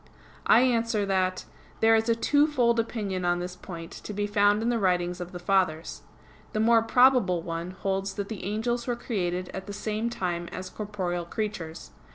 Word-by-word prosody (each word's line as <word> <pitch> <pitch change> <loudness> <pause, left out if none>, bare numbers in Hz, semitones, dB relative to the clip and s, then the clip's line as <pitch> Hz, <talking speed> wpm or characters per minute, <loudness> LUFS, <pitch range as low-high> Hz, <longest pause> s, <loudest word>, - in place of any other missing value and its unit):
I 230 - +7
answer 230 -4 +2
that, 185 -1 0 0.3
There 225 0 +5
is 225 +1 +1
a 230 - +4
twofold 255 -3 +3
opinion 205 -5 -2
on 175 0 +2
this 180 +1 -5
point 170 -3 -9
to 210 - -8
be 205 0 0
found 205 +1 +3
in 235 - +1
the 235 -1 +1
writings 180 -2 0
of 180 0 -6
the 180 - -6
Fathers. 175 -3 0 0.5
The 215 - -1
more 225 +1 +5
probable 230 -7 +4
one 165 +1 -4
holds 195 +1 -2
that 200 -1 -3
the 215 -4 -6
angels 235 +5 -2
were 245 - 0
created 185 -6 -2
at 190 - -6
the 205 - -5
same 215 +2 -2
time 175 -6 -3
as 185 +1 -7
corporeal 185 -5 -3
creatures. 180 -5 -5
200 Hz, 185 wpm, -27 LUFS, 180-225 Hz, 0.5 s, I